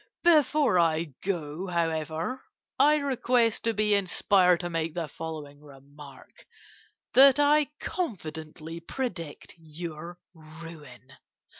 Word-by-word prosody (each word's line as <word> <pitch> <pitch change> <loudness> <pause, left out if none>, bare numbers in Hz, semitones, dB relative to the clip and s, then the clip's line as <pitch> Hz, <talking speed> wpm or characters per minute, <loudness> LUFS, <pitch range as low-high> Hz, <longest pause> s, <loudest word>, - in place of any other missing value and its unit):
Before 300 - +4
I 160 -2 +1
go, 175 -2 -3
however, 165 - -2 0.4
I 300 +1 +6
request 250 -5 +1
to 230 - +2
be 210 0 +2
inspired 185 -2 +3
to 175 - -4
make 165 0 -2
the 170 -3 -3
following 150 -2 -8
remark 140 -1 -15 0.7
that 275 +1 +7
I 295 +1 +4
confidently 160 - -5
predict 170 - -6
your 165 +1 -8 0.2
ruin. 155 -5 -13
170 Hz, 105 wpm, -27 LUFS, 155-225 Hz, 0.7 s, that